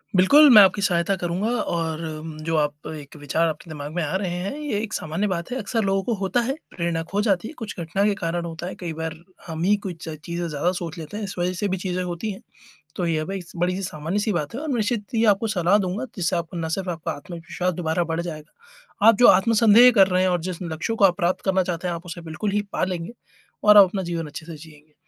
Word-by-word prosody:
बिल्कुल 285 +11 +7
मैं 215 -4 +10
आपकी 200 +1 +3
सहायता 180 +1 +1
करूँगा 180 +6 -1
और 165 -1 -2 0.2
म 155 -1 -7
जो 165 0 -1
आप 150 0 -1
एक 150 -2 -9
विचार 150 +3 0
आपके 160 +1 -5
दिमाग 150 -1 -6
में 175 - 0
आ 150 +5 -2
रहे 190 -2 -3
हैं 200 +9 -3
ये 290 -9 -2
एक 215 - -6
सामान्य 165 +7 -2
बात 175 +3 -3
है। 255 - -2
अक्सर 225 0 -1
लोगों 195 0 +1
को 235 - -1
होता 195 +5 +1
है 260 +3 -1 0.2
प्रेरणा 170 -2 -1
खो 205 +1 +1
जाती 200 -1 +1
है, - - -9
कुछ 225 -3 -6
घटना 175 +4 -1
के 210 - +3
कारण 170 0 -2
होता 170 +1 -6
है। - - -6
कई 170 -3 -4
बार 160 0 -4 0.3
हम 160 0 -5
ही 205 +3 +4
कुछ 185 -4 -4
च 155 - -4
चीज़ें 170 0 -3
ज़्यादा 155 +4 0
सोच 170 -3 -5
लेते 165 +6 -7
हैं, 215 - -4
इस 195 - -5
वजह 180 +1 0
से 200 +3 -2
भी 190 0 -1
चीज़ें 180 0 -2
होती 180 +4 -4
हैं, 190 - -9 0.6
तो 180 - -1
ये 155 -2 0
बईस 190 -1 -6
बड़ी-सी 180 +3 0
सामान्य-सी 190 +6 -2
बात 150 +1 -3
है 265 - -4
और 315 - -5
निश्चित 225 -4 0
ही 225 0 +2
आपको 210 +1 +3
सलाह 195 -1 +2
दूँगा 195 +5 -2
जिससे 180 0 0
आपको 170 +1 -4
ना 165 -1 -2
सिर्फ़ 185 +2 -2
आपका 165 -1 -3
आत्मविश्वास 175 +3 -4
दोबारा 170 0 -1
बढ़ 165 0 -2
जाएगा, 220 - -6
आप 225 - +7
जो 245 - +7
आत्मसंदेह 230 +3 +6
कर 190 - +8
रहे 185 -1 +1
हैं 185 - +3
और 175 -1 0
जिस 180 0 -5
लक्ष्यों 170 +7 -3
को 200 - +3
आप 180 -1 +5
प्राप्त 180 -1 0
करना 190 -1 +2
चाहते 175 0 -3
हैं, 170 - -1
आप 170 +2 -8
उसे 170 0 -7
बिल्कुल 165 +6 -3
ही 205 0 +1
पा - - +1
लेंगे 180 +2 -4 0.5
और 210 0 +7
आप 200 - +11
अपना 190 +1 -3
जीवन 170 -2 -3
अच्छे 160 +2 -9
से 165 -2 -8
जिएँगे। 150 -1 -16
180 Hz, 250 wpm, -23 LUFS, 165-205 Hz, 0.6 s, आप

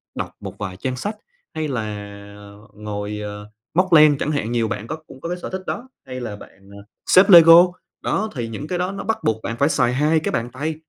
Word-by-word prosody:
đọc - - -4
một - - -8
vài 95 -3 -6
trang 130 +5 -3
sách 205 - -4 0.4
hay 155 -1 -2
là 125 -6 -2 0.9
ngồi, 105 0 -5
ờ, 105 0 -7 0.2
móc 185 +1 +2
len 150 -2 +7
chẳng 150 - -2
hạn, 130 -7 -2
nhiều 115 -2 0
bạn 110 +1 -5
có 155 - -4
cũng 130 - -14
có 170 - -5
cái 180 - -3
sở - - -5
thích 190 0 -5
đó, 255 +2 -5 0.2
hay 130 -1 -6
là 110 -4 -5
bạn, 100 -1 -16
à, 100 - -12 0.3
xếp 185 +2 +6
Lego 170 -1 +9 0.4
đó, 215 +2 -1
thì 120 -2 -3
những 115 +7 -7
cái 180 +2 -3
đó 180 +1 -1
nó 195 +1 -6
bắt 225 - -1
buộc 110 0 0
bạn 115 - -4
phải 140 +4 +2
xài 125 -6 +1
hai 150 +4 +2
cái 155 - -3
bàn 115 +1 -2
tay, 155 +5 -3
130 Hz, 235 wpm, -21 LUFS, 110-165 Hz, 0.9 s, Lego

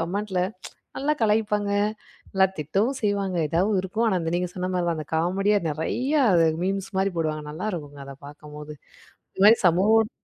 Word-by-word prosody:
கமெண்ட்ல 190 +2 -2 0.6
நல்லா 295 +3 +1
கலாய்ப்பாங்க, 210 -2 +1 0.6
நல்லா 190 0 +4
திட்டவும் 200 - -1
செய்வாங்க. 200 -3 -1
ஏதாவது 190 +4 +1
இருக்கும். 215 +5 -1
ஆனா, 190 -4 +2
அந்த 165 0 -2
நீங்க 180 0 -1
சொன்ன 185 0 -3
மாரி 175 -1 0
தான் 165 -2 -1
அந்த 155 - -6
காமெடியா 195 +5 +1
நறையா 260 - 0 0.4
மீம்ஸ் 195 0 -2
மாரி 195 +1 +1
போடுவாங்க 155 -2 -2
நல்லாயிருக்குங்க 155 -5 -5
அத 135 0 -9
பார்க்கும்போது. 150 0 -10 0.6
இந்த 190 - +1
மாதிரி 225 +2 +7
சமூகம் 215 +6 +3
190 Hz, 150 wpm, -24 LUFS, 165-210 Hz, 0.6 s, மாதிரி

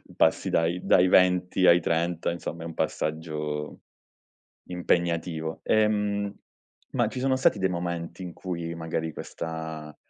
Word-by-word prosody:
passi - - +3
dai 85 +2 +1
dai 90 0 +5
20 90 0 +4
ai 85 +1 +7
30 85 +1 0
insomma 85 -1 -5
è - - -6
un 85 - -6
passaggio 75 -2 -3 0.9
impegnativo. 85 -2 -1
Ehm, 105 -2 +1 0.6
ma - - +2
ci - - -6
sono 130 0 +2
stati 130 - +3
dei 95 0 +1
momenti 85 0 -4
in 90 -2 -7
cui 85 -3 -4
magari 80 -1 -3
questa, 80 -2 -6
85 Hz, 130 wpm, -27 LUFS, 80-90 Hz, 0.9 s, ai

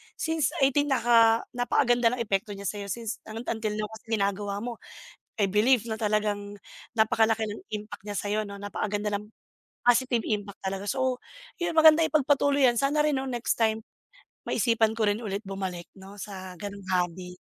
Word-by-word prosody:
Since 320 -4 -1
18, 285 +2 +3
naka 230 -3 +4
napakaganda 245 -1 +2
ng 235 - -2
epekto 200 0 -1
niya 200 - -9
sa‘yo. 200 -1 -4
Since 230 +1 -4
ano, 225 +2 -6
until 220 -2 -2
now 210 0 -3
kasi 220 - -11
ginagawa 200 -1 -1
mo. 240 -1 -5 0.6
I 200 - +3
believe 230 +4 +3
na 220 - -2
talagang 205 -2 -1 0.3
napakalaki 220 -1 +2
ng 205 - -6
impact 210 -1 -6
niya 205 -1 -5
sa‘yo 210 +1 -1
‘no, 200 0 -9
napakaganda 205 +1 -2
ng 205 - -7 0.6
positive 245 -1 +3
impact 205 -2 -3
talaga. 195 +1 -3
So, 260 0 0 0.4
yun, 340 -1 -1
maganda 315 0 +8
ipagpatuloy 285 -2 +2
‘yan. 235 -1 +1
Sana 295 +2 +2
rin 300 -2 +2
‘no, 270 - -4
next 240 -2 -1
time 220 0 +1 0.6
maisipan 225 -2 +2
ko 225 - +1
rin 205 +3 0
ulit 205 -2 -4
bumalik 190 -3 -5
‘no 195 +1 -12
sa 190 -3 -8
gano’ng 200 0 -8
hobby. 180 +1 -3
220 Hz, 170 wpm, -27 LUFS, 205-245 Hz, 0.6 s, maganda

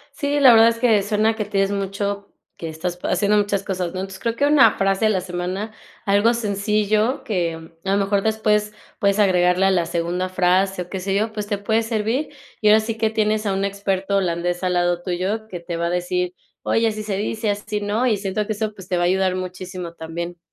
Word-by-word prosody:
Sí, 285 +1 0
la 260 -3 +8
verdad 225 0 +7
es 230 - -1
que 225 -4 +3
suena 215 +2 +1
que 210 - -2
tienes 195 -1 0
mucho 200 0 -3 0.2
que 165 - -6
estás 170 +3 -4
pa - - -4
haciendo 200 +3 +2
muchas 200 -1 +1
cosas, 185 -3 -3
¿no?, 185 - -3
entonces, 190 0 -6
creo 230 -1 -2
que 285 - 0
una 290 -2 +6
frase 195 +2 +1
a - - +5
la 190 -3 +1
semana, 185 +4 -4 0.3
algo 205 +4 +3
sencillo 210 +2 0
que 165 -5 -3
a 195 - 0
lo - - +3
mejor 200 0 +1
después 215 -1 +1 0.3
puedes 200 +1 +2
agregarle 180 -1 +3
a - - +4
la 175 -3 +1
segunda 175 +2 -2
frase, 185 +1 +1
o 175 - -12
qué 190 - -3
sé 195 +1 -2
yo, 215 +2 0
pues, 210 -1 -4
te 205 -1 -2
puede 220 +3 +1
servir. 225 +6 -1 0.3
Y 215 - +3
ahora 215 +1 +6
sí 225 +1 -4
que, 220 -1 +1
tienes 215 -1 0
a 200 - +1
un 195 - -1
experto 200 0 -1
holandés 175 -1 -1
al 180 - +1
lado 175 0 +1
tuyo 190 +5 -2
que 180 -5 -7
te 170 0 -5
va 170 0 -1
a - - -1
decir: 180 0 -1 0.3
"Oye, 225 0 +2
así 215 -1 -4
se 200 -2 -2
dice, 215 +2 -2
así 205 +1 -3
no", 210 +5 0
y 215 - +2
siento 200 +1 -2
que - - 0
eso, 215 0 -3
pues, 190 -2 -12
te 180 - 0
va 175 - +1
a - - +3
ayudar 185 0 +1
muchísimo 185 -1 -6
también. 170 +2 -6
200 Hz, 230 wpm, -21 LUFS, 180-215 Hz, 0.3 s, la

